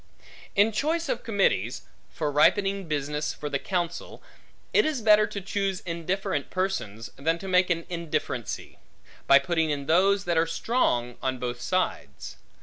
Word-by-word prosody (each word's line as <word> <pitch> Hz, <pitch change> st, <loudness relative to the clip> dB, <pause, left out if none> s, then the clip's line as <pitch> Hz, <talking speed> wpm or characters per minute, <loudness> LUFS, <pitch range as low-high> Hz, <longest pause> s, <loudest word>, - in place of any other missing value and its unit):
In 205 Hz, +3 st, +4 dB
choice 315 Hz, +8 st, -1 dB
of 240 Hz, -, -1 dB
committees; 130 Hz, -, 0 dB, 0.3 s
for 150 Hz, -2 st, -2 dB
ripening 195 Hz, +5 st, +3 dB
business 150 Hz, 0 st, -2 dB
for 150 Hz, -1 st, -6 dB
the 140 Hz, -, 0 dB
counsel, 175 Hz, -1 st, -3 dB, 0.5 s
it 420 Hz, -, +5 dB
is 310 Hz, -4 st, -1 dB
better 215 Hz, -1 st, +5 dB
to 210 Hz, -2 st, -5 dB
choose 195 Hz, -1 st, -2 dB
indifferent 170 Hz, -3 st, -2 dB
persons, 120 Hz, -, -3 dB
than 160 Hz, +4 st, 0 dB
to 195 Hz, -, -8 dB
make 185 Hz, 0 st, +3 dB
an 170 Hz, -1 st, 0 dB
indifferency, 170 Hz, -3 st, -4 dB, 0.5 s
by 140 Hz, -, +8 dB
putting 160 Hz, +2 st, 0 dB
in 145 Hz, -2 st, -2 dB
those, 195 Hz, +5 st, +3 dB
that 170 Hz, -2 st, +2 dB
are 165 Hz, -, +2 dB
strong 125 Hz, -, 0 dB
on 130 Hz, 0 st, -1 dB
both 120 Hz, -1 st, -4 dB
sides. -, -, -2 dB
170 Hz, 150 wpm, -26 LUFS, 145-200 Hz, 0.5 s, by